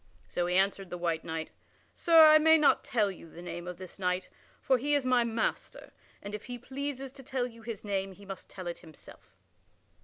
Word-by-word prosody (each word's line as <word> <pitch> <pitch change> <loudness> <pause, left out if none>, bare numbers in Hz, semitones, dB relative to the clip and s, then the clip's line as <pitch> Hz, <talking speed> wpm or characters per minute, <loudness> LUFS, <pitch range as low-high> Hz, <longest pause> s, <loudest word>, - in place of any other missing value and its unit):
So 175 0 -1
he 180 - 0
answered 195 0 +1
the 180 - -5
white 170 -2 -1
knight: 160 0 -5 0.4
"Sir, 330 -2 +7
I 310 0 +8
may 320 +1 +6
not 300 -2 +4
tell 210 -4 +1
you 165 -3 -12
the 170 +2 -11
name 175 0 -6
of 180 -1 -6
this 185 +1 -10
knight, 180 0 -1 0.3
for 260 -2 +2
he 290 +4 +1
is 280 -3 +1
my 250 -1 +4
master, 230 -1 -3 0.3
and 200 - -7
if 210 - -6
he 245 0 -6
pleases 270 +1 -5
to 275 0 -12
tell 260 -1 -2
you 230 -2 -10
his 225 -2 -7
name 195 -1 -2
he 200 +2 -15
must 195 -1 -8
tell 185 -2 -9
it 175 0 -5
himself." 160 -3 -16
205 Hz, 215 wpm, -30 LUFS, 180-260 Hz, 0.4 s, I